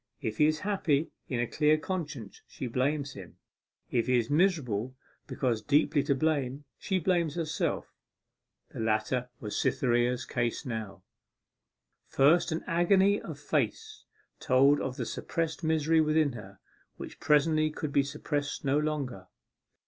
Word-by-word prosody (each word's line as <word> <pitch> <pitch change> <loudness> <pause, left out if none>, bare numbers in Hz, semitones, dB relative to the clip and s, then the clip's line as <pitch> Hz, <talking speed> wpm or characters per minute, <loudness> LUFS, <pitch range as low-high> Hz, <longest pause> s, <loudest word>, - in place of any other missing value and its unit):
If 110 -1 -4
he 150 - +6
is 155 0 0
happy 165 -7 0 0.2
in 125 - -2
a 120 - +1
clear 150 +5 +2
conscience, 155 - -5
she - - -7
blames 140 +3 -1
him; 95 -4 -11 0.5
if 120 -1 +1
he 125 -1 +3
is 120 +2 -1
miserable 135 - +1 0.3
because 120 -5 -1
deeply 145 +4 +2
to 140 - +2
blame, 145 -2 -1
she 190 - -1
blames 170 -3 +1
herself. 160 -3 -2 0.8
The - - -9
latter 115 +3 0
was 105 -2 -5
Cytherea's 125 0 +1
case 120 +3 -2
now. 110 -5 -5 1.0
First, 155 +6 +3
an 160 - -2
agony 190 +4 +3
of - - -7
face 440 -1 -2 0.4
told 135 +3 +4
of 130 -1 -4
the - - -2
suppressed 165 0 -3
misery 160 0 +3
within 155 -1 +2
her, 100 -5 -10 0.4
which - - -9
presently 155 +1 +3
could 155 -1 -5
be 140 - +5
suppressed 145 +1 -3
no 140 +2 +2
longer. 140 -11 -3
145 Hz, 140 wpm, -29 LUFS, 125-160 Hz, 1.0 s, he